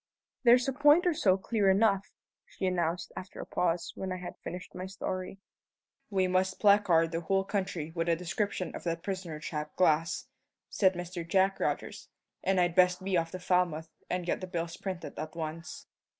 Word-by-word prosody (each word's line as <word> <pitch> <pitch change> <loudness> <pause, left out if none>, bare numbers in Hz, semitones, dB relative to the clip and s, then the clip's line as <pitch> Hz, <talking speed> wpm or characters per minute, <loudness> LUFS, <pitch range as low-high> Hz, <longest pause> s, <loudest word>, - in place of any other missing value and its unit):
"There's 245 +1 +6
a 270 - 0
point 295 +6 +5
or 350 - +3
so 195 - +3
clear 200 0 +1
enough," 195 0 +3 0.4
she - - -5
announced, 175 -2 -1
after 185 - -8
a - - -5
pause, 175 -1 0
when 190 -1 -5
I 185 - -2
had 180 0 -7
finished 180 +1 -7
my 185 +1 -5
story. 185 0 -4 0.7
"We 190 -3 +2
must 185 +1 +1
placard 195 -6 +4
the 165 0 -2
whole 195 +3 +1
country 190 -6 -3
with 165 0 -1
a 165 - +4
description 180 +1 -2
of - - -7
that 165 0 -2
prisoner 185 -5 -4
chap 150 -1 -5
Glass," 160 -2 +2 0.5
said 190 -2 +3
Mr. 175 0 -5
Jack 190 +3 +2
Rogers; - - -3 0.3
"and 190 -1 +2
I'd 175 -1 +2
best 180 0 +4
be 190 -1 0
off 165 -1 +1
to 185 - -6
Falmouth 180 -3 +1 0.2
and 180 -1 -1
get 175 - -1
the 185 - -4
bills 170 -2 -3
printed 185 -6 -6
at 155 +1 -5
once." 165 - -6
185 Hz, 185 wpm, -30 LUFS, 170-195 Hz, 0.7 s, There's